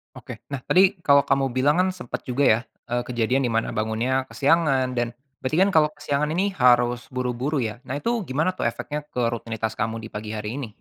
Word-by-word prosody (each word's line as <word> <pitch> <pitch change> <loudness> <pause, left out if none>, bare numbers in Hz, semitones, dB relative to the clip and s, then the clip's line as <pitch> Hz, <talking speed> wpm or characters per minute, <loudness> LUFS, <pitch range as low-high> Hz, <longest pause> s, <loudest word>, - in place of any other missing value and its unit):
Oke. - - -10
Nah, 140 - -2
tadi 190 0 +4
kalau 140 -4 +5
kamu 135 -1 +1
bilang, 145 +3 +3
kan, 185 - +3
sempat 150 -10 -6
juga, 130 +3 0
ya, 110 -4 +5 0.3
eee, 120 0 0
kejadian 125 +2 +1
di - - -2
mana 115 - 0
bangunnya 115 +5 -1
kesiangan 140 -4 +2
dan 120 -1 -2 0.2
berarti, 130 +3 -2
kan, 200 - +2
kalau 155 -3 +5
kesiangan 145 0 -1
ini 200 +2 +1
harus 120 -5 +3
buru-buru, 125 +2 -2
ya, 110 +1 -4
nah, 130 - -3
itu 230 +12 -1 0.2
gimana, 155 +8 +1
tuh, 185 - -2
efeknya 150 0 -4
ke 125 - -3
rutinitas 115 -1 -3
kamu 115 0 -2
di 110 - -7
pagi 105 0 -6
hari 105 +5 -4
ini? 130 - -4
130 Hz, 205 wpm, -24 LUFS, 120-145 Hz, 0.3 s, kalau